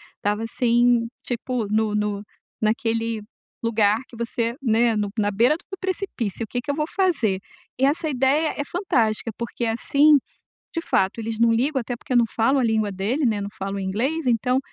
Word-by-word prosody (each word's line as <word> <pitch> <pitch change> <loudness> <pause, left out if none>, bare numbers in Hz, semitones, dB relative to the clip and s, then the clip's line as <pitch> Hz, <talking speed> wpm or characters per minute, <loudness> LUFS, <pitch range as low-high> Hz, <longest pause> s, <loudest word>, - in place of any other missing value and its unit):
estava 210 +1 -1
assim, 235 0 +2 0.2
tipo 245 -2 -2
no 215 +1 +1
no 210 -1 -1 0.4
naquele 225 0 0 0.4
lugar 215 -2 +3
que 235 - -13
você, 235 0 -2
né, 230 -2 +3
no 210 -1 0
na 205 -1 +2
beira 235 +9 +3
do 385 +3 -10
precipício, 370 - -3
o - - -20
que 245 +3 -3
que 285 - -2
eu - - -3
vou 300 0 -1
fazer? 295 - +2 0.4
E 265 - +4
essa 310 +3 +1
ideia 280 +4 +2
é - - +1
fantástica 245 - 0
porque 235 0 -3
assim, 285 +6 +4 0.6
de 330 - -1
fato 195 - +1
eles 225 0 -4
não 230 0 +5
ligam 265 +5 +1
até 245 +1 -4
porque 255 - -5
eu - - +5
não 235 - +5
falo 265 +5 +3
a - - +2
língua 220 -3 +1
dele, 215 +10 -1
né, 215 -4 +1
não 200 - -4
falam 195 +1 -3
inglês 250 +11 -1
então, 250 +2 +2
230 Hz, 185 wpm, -23 LUFS, 215-265 Hz, 0.6 s, não